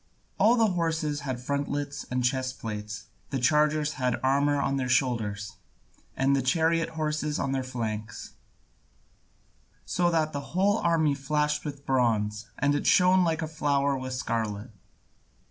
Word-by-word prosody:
All 230 Hz, +3 st, +5 dB
the 225 Hz, -4 st, +3 dB
horses 160 Hz, -4 st, -1 dB
had 130 Hz, -3 st, -4 dB
frontlets 140 Hz, +2 st, -3 dB
and 125 Hz, 0 st, -1 dB
chest 130 Hz, 0 st, -1 dB
plates, 105 Hz, -3 st, -6 dB, 0.2 s
the 135 Hz, -, -2 dB
chargers 150 Hz, +3 st, +2 dB
had 125 Hz, -1 st, +1 dB
armour 140 Hz, +2 st, +2 dB
on 140 Hz, 0 st, 0 dB
their 130 Hz, -2 st, -2 dB
shoulders, 110 Hz, -6 st, 0 dB, 0.6 s
and 135 Hz, +1 st, +3 dB
the 135 Hz, -, +1 dB
chariot 165 Hz, +5 st, +2 dB
horses 150 Hz, -1 st, -1 dB
on 135 Hz, -, -1 dB
their 135 Hz, -1 st, 0 dB
flanks; 110 Hz, -4 st, -5 dB, 1.5 s
so 175 Hz, -1 st, +1 dB
that 160 Hz, -2 st, +1 dB
the 140 Hz, -, -3 dB, 0.2 s
whole 205 Hz, +3 st, +3 dB
army 160 Hz, -3 st, +2 dB
flashed 150 Hz, +2 st, 0 dB
with 145 Hz, -2 st, -7 dB
bronze, 110 Hz, -4 st, +1 dB
and 145 Hz, 0 st, +1 dB
shone 185 Hz, 0 st, +5 dB
like 165 Hz, -1 st, 0 dB
a -, -, -2 dB
flower 140 Hz, -3 st, +1 dB
with 130 Hz, -1 st, -4 dB
scarlet. 115 Hz, -2 st, -3 dB
140 Hz, 145 wpm, -27 LUFS, 125-155 Hz, 1.5 s, All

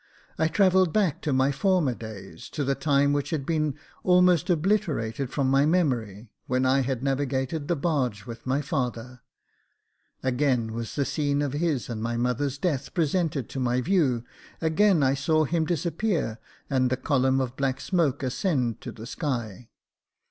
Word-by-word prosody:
I 160 Hz, -, +3 dB
travelled 185 Hz, 0 st, +3 dB
back 185 Hz, -6 st, +1 dB
to 150 Hz, -, -1 dB
my 130 Hz, +1 st, +3 dB
former 165 Hz, -2 st, +2 dB
days 100 Hz, -7 st, -9 dB
— -, -, -30 dB
to 150 Hz, -, -1 dB
the 140 Hz, 0 st, +1 dB
time 140 Hz, 0 st, +2 dB
which 145 Hz, -1 st, -1 dB
had 150 Hz, -5 st, -2 dB
been 155 Hz, -3 st, 0 dB, 0.3 s
almost 180 Hz, -1 st, +4 dB
obliterated 155 Hz, -, 0 dB
from 135 Hz, -1 st, 0 dB
my 135 Hz, +1 st, +4 dB
memory, 120 Hz, -, 0 dB, 0.2 s
when 130 Hz, +1 st, +1 dB
I 130 Hz, +1 st, +4 dB
had 130 Hz, -1 st, -2 dB
navigated 135 Hz, +2 st, -1 dB
the 175 Hz, -, +1 dB
barge 135 Hz, -9 st, -1 dB
with 115 Hz, 0 st, -9 dB
my 135 Hz, +3 st, +1 dB
father. 125 Hz, -5 st, -3 dB, 1.0 s
Again 125 Hz, -3 st, +1 dB
was 115 Hz, 0 st, -5 dB
the 140 Hz, -, +1 dB
scene 145 Hz, -1 st, 0 dB
of 140 Hz, -2 st, -2 dB
his 150 Hz, -4 st, -1 dB
and 115 Hz, -3 st, -5 dB
my 115 Hz, +1 st, -2 dB
mother's 125 Hz, +3 st, -1 dB
death 145 Hz, -4 st, -2 dB
presented 160 Hz, -5 st, 0 dB
to 135 Hz, -, -5 dB
my 125 Hz, 0 st, +1 dB
view; 135 Hz, -7 st, +1 dB, 0.4 s
again 165 Hz, +1 st, +3 dB
I 135 Hz, 0 st, +3 dB
saw 155 Hz, +3 st, +2 dB
him 160 Hz, +2 st, 0 dB
disappear, 170 Hz, -, -1 dB, 0.3 s
and 130 Hz, -2 st, +1 dB
the 130 Hz, -, 0 dB
column 130 Hz, -1 st, +2 dB
of 130 Hz, -1 st, -2 dB
black 135 Hz, -1 st, -1 dB
smoke 155 Hz, -3 st, 0 dB
ascend 130 Hz, -, -1 dB
to -, -, -6 dB
the 110 Hz, -, -10 dB
sky. 120 Hz, -, -4 dB
140 Hz, 170 wpm, -26 LUFS, 125-160 Hz, 1.0 s, almost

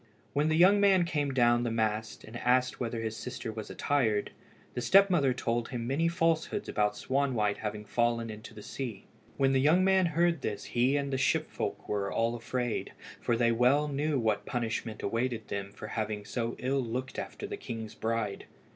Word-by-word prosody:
When 145 Hz, +2 st, +2 dB
the 155 Hz, -, +2 dB
young 190 Hz, +4 st, +6 dB
man 190 Hz, -3 st, +5 dB
came 145 Hz, -4 st, -1 dB
down 120 Hz, -2 st, +4 dB
the 120 Hz, -, 0 dB
mast, 110 Hz, -1 st, -1 dB
and 110 Hz, -, -11 dB
asked 125 Hz, +1 st, +2 dB
whether 115 Hz, -2 st, -2 dB
his 110 Hz, -1 st, -3 dB
sister 120 Hz, -1 st, -5 dB
was 110 Hz, -1 st, -7 dB
attired, 115 Hz, -8 st, 0 dB, 0.4 s
the 125 Hz, -, -3 dB
step 195 Hz, +7 st, +6 dB
mother 140 Hz, -7 st, +3 dB
told 120 Hz, -1 st, -1 dB
him 120 Hz, -2 st, -4 dB
many 140 Hz, +7 st, +1 dB
falsehoods 165 Hz, +3 st, 0 dB
about 105 Hz, -1 st, +1 dB
Swanwhite 130 Hz, -7 st, 0 dB
having 105 Hz, 0 st, -5 dB
fallen 115 Hz, 0 st, 0 dB
into 110 Hz, +1 st, -10 dB
the 105 Hz, -, -9 dB
sea. 115 Hz, -8 st, -6 dB, 0.3 s
When 135 Hz, -1 st, +3 dB
the 135 Hz, -, +3 dB
young 160 Hz, +6 st, +4 dB
man 190 Hz, -1 st, +4 dB
heard 170 Hz, -1 st, +1 dB
this 105 Hz, -4 st, -3 dB
he 125 Hz, +4 st, +2 dB
and 140 Hz, -1 st, -1 dB
all -, -, -5 dB
the 130 Hz, -, 0 dB
ship 130 Hz, -, +1 dB
folk -, -, -4 dB
were 100 Hz, -1 st, -1 dB
afraid, 115 Hz, +1 st, -1 dB, 0.3 s
for 120 Hz, -, +1 dB
they 115 Hz, 0 st, +3 dB
well 125 Hz, +6 st, +3 dB
knew 145 Hz, +1 st, 0 dB
what 110 Hz, -4 st, 0 dB
punishment 115 Hz, -2 st, -3 dB
awaited 115 Hz, +1 st, -2 dB
them 100 Hz, 0 st, -4 dB
for -, -, -9 dB
having 105 Hz, -2 st, -3 dB
so 115 Hz, +1 st, -2 dB
ill 135 Hz, +1 st, 0 dB
looked 125 Hz, +3 st, -4 dB
after -, -, -6 dB
the -, -, -4 dB
king's 110 Hz, -2 st, -6 dB
bride. 110 Hz, -3 st, -2 dB
120 Hz, 190 wpm, -30 LUFS, 110-140 Hz, 0.4 s, young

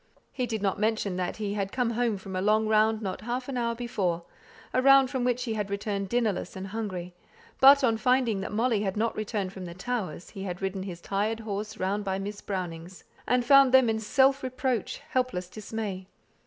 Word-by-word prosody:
He 250 Hz, -2 st, -2 dB
did 220 Hz, -3 st, -3 dB
not 195 Hz, -1 st, 0 dB
mention 215 Hz, -3 st, 0 dB
that 180 Hz, -1 st, -2 dB
he 205 Hz, -2 st, -2 dB
had 195 Hz, -1 st, -2 dB
come 250 Hz, -2 st, 0 dB
home 235 Hz, -2 st, 0 dB
from 190 Hz, 0 st, -8 dB
a 185 Hz, -, -1 dB
long 215 Hz, +2 st, +3 dB
round 220 Hz, 0 st, +3 dB
not 190 Hz, -2 st, -4 dB
half 245 Hz, +3 st, -3 dB
an 275 Hz, -, -4 dB
hour 235 Hz, -1 st, 0 dB
before, 195 Hz, -8 st, -2 dB, 0.5 s
a 255 Hz, -, +3 dB
round 275 Hz, 0 st, +6 dB
from 260 Hz, -3 st, -1 dB
which 250 Hz, 0 st, +1 dB
he 230 Hz, -3 st, -2 dB
had 210 Hz, -2 st, -2 dB
returned 200 Hz, -1 st, -3 dB
dinnerless 225 Hz, -6 st, -1 dB
and 190 Hz, 0 st, -5 dB
hungry; 190 Hz, -4 st, -5 dB, 0.5 s
but, 280 Hz, +1 st, +8 dB
on 225 Hz, -3 st, +3 dB
finding 240 Hz, -3 st, +2 dB
that -, -, -5 dB
Molly 225 Hz, 0 st, +1 dB
had 195 Hz, -1 st, -2 dB
not 225 Hz, +2 st, +1 dB
come 215 Hz, -, -3 dB, 0.2 s
back 185 Hz, -, -7 dB
from 190 Hz, -2 st, -7 dB
the 170 Hz, -1 st, -8 dB
Towers, 185 Hz, -5 st, -4 dB
he 195 Hz, -, -8 dB
had 180 Hz, -2 st, -4 dB
ridden 195 Hz, 0 st, -3 dB
his 180 Hz, -3 st, -7 dB
tired 210 Hz, +4 st, -1 dB
horse 215 Hz, 0 st, -4 dB
round 200 Hz, +3 st, -1 dB
by 190 Hz, -1 st, -1 dB
Miss 200 Hz, +1 st, -5 dB
Brownings', 180 Hz, -2 st, -5 dB, 0.2 s
and 250 Hz, -1 st, +2 dB
found 275 Hz, 0 st, +7 dB
them 255 Hz, -3 st, +6 dB
in 220 Hz, -, -1 dB
self 270 Hz, +5 st, +3 dB
reproachful, 255 Hz, -3 st, -2 dB
helpless 250 Hz, -9 st, 0 dB
dismay. 200 Hz, -1 st, -5 dB
215 Hz, 210 wpm, -28 LUFS, 195-245 Hz, 0.5 s, but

